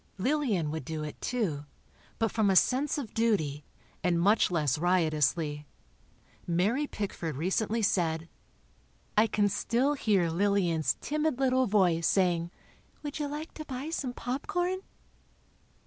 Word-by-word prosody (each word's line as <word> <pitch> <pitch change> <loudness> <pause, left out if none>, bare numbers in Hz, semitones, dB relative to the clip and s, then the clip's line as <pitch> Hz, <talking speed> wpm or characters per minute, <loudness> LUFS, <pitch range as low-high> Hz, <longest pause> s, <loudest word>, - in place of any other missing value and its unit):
Lillian 215 - 0
would 160 -1 -4
do 155 +3 -4
it, 150 - -7
too, 170 -13 -2 0.5
but 225 -1 0
from 215 -3 +2
a 190 - +3
sense 265 +10 +3
of 260 -8 -5
duty, 160 -11 0 0.4
and 175 -1 +2
much 205 +6 +4
less 150 -5 +1
riotously. 155 -3 +1 0.8
Mary 205 - +1
Pickford 170 - -4
recently 210 +7 0
said: 165 -4 +1 0.9
"I 215 +2 +5
can 205 -1 +2
still 235 +7 +1
hear 200 - +1
Lillian's 175 -3 +1
timid 305 -2 0
little 260 -1 +2
voice 180 -5 +3
saying: 175 -3 +2 0.5
'Would 290 +1 -5
you 295 - -1
like 300 +3 -6
to 310 - -8
buy 270 +3 -5
some 270 -6 -2
popcorn?! 350 +10 -2
200 Hz, 130 wpm, -29 LUFS, 165-255 Hz, 0.9 s, I